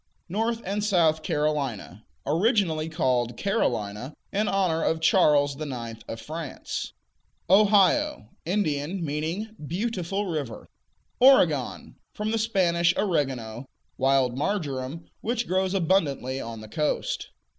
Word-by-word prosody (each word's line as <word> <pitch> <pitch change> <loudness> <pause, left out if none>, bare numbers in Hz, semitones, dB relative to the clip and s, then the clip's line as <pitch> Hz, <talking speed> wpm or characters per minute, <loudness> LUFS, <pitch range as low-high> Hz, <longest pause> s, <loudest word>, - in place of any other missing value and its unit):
North 225 +5 -1
and 200 +2 -1
South 165 -6 +3
Carolina 135 - -2 0.2
Originally 165 - +1
called 125 -7 0
Carolina, 125 - -1 0.2
in 210 +2 +1
honor 185 -5 +1
of 160 - +1
Charles 150 -5 +3
IX. 120 -6 -5
of 115 - -6
France. 155 +5 -5 0.5
Ohio 210 - +4 0.2
Indian; 170 -2 -1
meaning 165 +9 -3
"beautiful 195 +1 -2
river." 150 - -4 0.5
Oregon 175 - +4 0.2
From 215 +1 -2
the 225 - +1
Spanish 175 -6 +2
"oregano," 130 - -1 0.3
wild 135 -2 +2
marjoram, 145 -3 -2
which 235 +1 -1
grows 185 +1 +1
abundantly 150 -8 +1
on 115 -1 -7
the 110 - -9
coast. 150 +5 -2
160 Hz, 110 wpm, -26 LUFS, 135-195 Hz, 0.5 s, Ohio